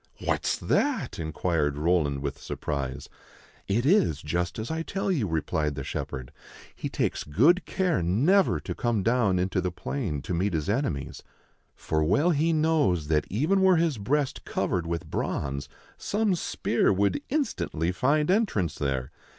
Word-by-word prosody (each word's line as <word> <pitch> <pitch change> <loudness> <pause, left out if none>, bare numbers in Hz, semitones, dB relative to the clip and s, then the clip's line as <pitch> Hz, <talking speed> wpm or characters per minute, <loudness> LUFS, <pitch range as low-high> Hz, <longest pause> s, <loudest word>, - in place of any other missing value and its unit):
"What's - - 0
that?" 285 - 0
inquired 80 -2 -1
Roland, 75 -4 +1
with 70 -1 -4
surprise. 70 -3 -4 0.3
" - - -28
It 120 - 0
is 165 - +3
just 85 +3 -2
as 110 +7 -4
I 160 0 -1
tell 195 +3 -2
you," 135 - 0
replied 75 -2 -1
the 70 - -4
shepherd. 65 -1 -5 0.2
" - - -19
He - - -4
takes - - -1
good 140 - +3
care 180 - +1
never 140 - +3
to - - -4
come 120 -6 0
down 115 -5 +2
into 95 +1 0
the 90 - -1
plain 90 - -4
to 90 - -3
meet 90 +3 0
his 80 0 -1
enemies; 115 - -2 0.5
for 80 0 -1
well 145 - +3
he 160 +2 +2
knows 150 - +2
that, 75 -1 +2
even 155 - +2
were 190 -1 +6
his 160 -7 +1
breast 140 +7 -1
covered 85 -2 -1
with 85 0 -3
bronze, 70 -1 -3 0.3
some 210 -1 +1
spear 175 - +1
would 100 - +1
instantly 90 - -1
find 150 - +2
entrance 150 - +1
there. 65 -3 -2
95 Hz, 160 wpm, -27 LUFS, -, 0.5 s, were